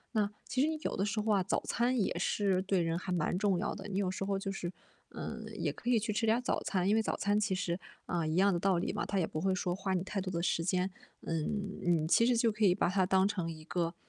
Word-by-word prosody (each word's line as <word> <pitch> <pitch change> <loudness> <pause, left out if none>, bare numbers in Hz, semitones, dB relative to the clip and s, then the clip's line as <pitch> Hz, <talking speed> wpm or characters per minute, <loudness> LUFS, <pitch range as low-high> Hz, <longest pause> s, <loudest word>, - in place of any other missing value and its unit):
那 210 -2 +2 0.2
其 255 - 0
实 295 - +4
你 315 - -1
有 - - -1
的 195 - 0
时 210 +1 -1
候 215 0 +1
啊， 195 - +3
早 185 - -1
餐 245 +1 +1
也 195 - 0
是 195 -3 +1
对 190 -1 +1
人 165 0 0
还 185 - -5
蛮 175 -1 0
重 200 -2 +2
要 175 - -1
的， 200 0 -7
你 195 - -3
有 195 -2 +1
时 190 - -4
候 195 0 0
就 195 0 -3
是， 175 -3 -4 0.4
嗯， - - -6
也 - - -1
可 245 - -5
以 245 - +5
去 215 0 -1
吃 225 +2 0
点 225 +2 +4
早 250 - -1
餐。 185 -1 0
因 210 - +4
为 225 - +4
早 - - -2
餐 205 +1 +2
其 210 -2 0
实， 175 -1 -2 0.3
啊， 170 -2 -1
一 155 - -1
样 195 +1 +4
的 170 - 0
道 190 -1 +2
理 170 - -1
嘛， 205 - -2
它 200 - -1
也 180 - +2
不 155 - -4
会 190 +1 +2
说 180 -1 -1
花 190 0 -1
你 180 - 0
太 200 0 -3
多 185 0 -4
的 170 - -1
时 165 - +1
间。 185 +2 0 0.3
嗯 195 +5 -2
嗯， 170 -3 +2
其 230 +7 +5
实 245 -2 +3
就 230 -1 +3
可 215 +1 -2
以 185 -3 +5
把 - - +2
它 185 0 +2
当 190 0 +4
成 185 -5 -2
一 155 -1 -10
个 170 +1 -2
195 Hz, 310 characters per minute, -32 LUFS, 180-210 Hz, 0.4 s, 以